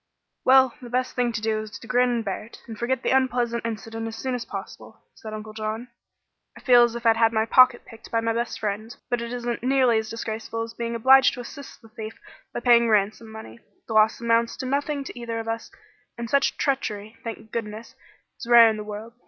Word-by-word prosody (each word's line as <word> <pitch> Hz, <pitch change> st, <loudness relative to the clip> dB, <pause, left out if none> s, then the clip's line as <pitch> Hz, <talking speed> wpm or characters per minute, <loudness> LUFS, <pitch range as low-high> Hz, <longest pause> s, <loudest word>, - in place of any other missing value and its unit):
"Well, 260 Hz, -1 st, +5 dB
the 245 Hz, -, -9 dB
best 255 Hz, +1 st, -1 dB
thing 245 Hz, -1 st, +1 dB
to 230 Hz, -2 st, -4 dB
do 220 Hz, -1 st, 0 dB
is 215 Hz, -1 st, -7 dB
to -, -, -13 dB
grin 250 Hz, +1 st, +2 dB
and 235 Hz, -2 st, -1 dB
bear 195 Hz, +1 st, -3 dB
it, 230 Hz, -, -15 dB
and 225 Hz, -, -8 dB
forget 240 Hz, +3 st, -2 dB
the -, -, +1 dB
unpleasant 245 Hz, -3 st, +1 dB
incident 225 Hz, 0 st, -5 dB
as 225 Hz, -, -6 dB
soon 260 Hz, +3 st, -3 dB
as 245 Hz, -1 st, -3 dB
possible," -, -, -9 dB
said 220 Hz, -, -10 dB
Uncle 215 Hz, 0 st, -7 dB
John. 220 Hz, +2 st, -4 dB, 0.7 s
"I -, -, -11 dB
feel 245 Hz, -2 st, +6 dB
as 235 Hz, -1 st, +3 dB
if 235 Hz, 0 st, -7 dB
I'd 225 Hz, 0 st, +5 dB
had 225 Hz, 0 st, +4 dB
my 220 Hz, -1 st, +1 dB
pocket 255 Hz, +1 st, +5 dB
picked 225 Hz, 0 st, -14 dB
by 230 Hz, -, +1 dB
my 225 Hz, 0 st, 0 dB
best 235 Hz, +1 st, -3 dB
friend, 215 Hz, +2 st, -4 dB
but 245 Hz, -1 st, 0 dB
it 235 Hz, 0 st, -5 dB
isn't 240 Hz, -1 st, -3 dB
nearly 255 Hz, -2 st, +3 dB
as 220 Hz, 0 st, -5 dB
disgraceful 225 Hz, 0 st, -4 dB
as 230 Hz, 0 st, -8 dB
being 235 Hz, 0 st, -4 dB
obliged 265 Hz, +3 st, +6 dB
to 250 Hz, -, -6 dB
assist 280 Hz, +1 st, -11 dB
the 225 Hz, -, -16 dB
thief 220 Hz, 0 st, -8 dB, 0.3 s
by 240 Hz, -, -5 dB
paying 235 Hz, -1 st, +5 dB
ransom 215 Hz, +2 st, +1 dB
money. 115 Hz, -, -10 dB, 0.3 s
The 225 Hz, -, -4 dB
loss 215 Hz, 0 st, +4 dB
amounts 230 Hz, 0 st, +1 dB
to 265 Hz, -, -5 dB
nothing 280 Hz, +2 st, -1 dB
to 255 Hz, -, -9 dB
either 230 Hz, -1 st, -4 dB
of 225 Hz, -, -6 dB
us, 225 Hz, 0 st, -4 dB, 0.5 s
and 235 Hz, 0 st, -4 dB
such 280 Hz, +4 st, +1 dB
treachery, 220 Hz, -6 st, -2 dB
thank 225 Hz, -2 st, -8 dB
goodness, 220 Hz, 0 st, -5 dB, 0.5 s
is -, -, -8 dB
rare 235 Hz, -1 st, +8 dB
in 215 Hz, -, -4 dB
the 210 Hz, -, -5 dB
world. 210 Hz, +2 st, -8 dB
230 Hz, 225 wpm, -24 LUFS, 220-245 Hz, 0.7 s, rare